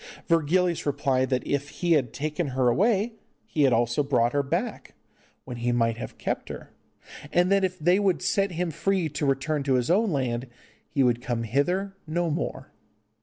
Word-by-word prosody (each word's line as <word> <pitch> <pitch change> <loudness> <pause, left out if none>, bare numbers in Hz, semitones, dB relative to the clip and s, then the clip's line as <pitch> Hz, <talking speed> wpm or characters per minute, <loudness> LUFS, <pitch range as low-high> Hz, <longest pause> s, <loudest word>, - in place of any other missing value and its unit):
Virgilius 170 +1 +1
replied 135 -2 +1
that 130 -1 0
if 140 0 -1
he 175 -1 -2
had 135 -8 +3
taken 150 +2 -2
her 130 -2 +1
away 210 - +2 0.3
he 160 -8 -2
had 135 -2 +5
also 120 +3 +2
brought 120 -4 +1
her 145 - +2
back, 170 - -3 0.5
when 125 - -6
he 120 +1 0
might 115 -2 +1
have - - -7
kept - - -3
her, - - -8 0.6
and 180 +2 +3
that 200 -1 +4
if 185 -1 -1
they 175 +4 +3
would 195 -3 +1
set 195 -3 +1
him 175 0 -2
free 190 +2 0
to 150 0 -2
return 140 +2 0
to 135 -1 +1
his 125 +4 +1
own 215 +4 +3
land 130 -5 -1 0.4
he 140 - +1
would 120 -1 +2
come 120 -2 -2
hither 180 - 0
no 170 +1 0
more. 160 - -4
150 Hz, 185 wpm, -26 LUFS, 130-180 Hz, 0.6 s, had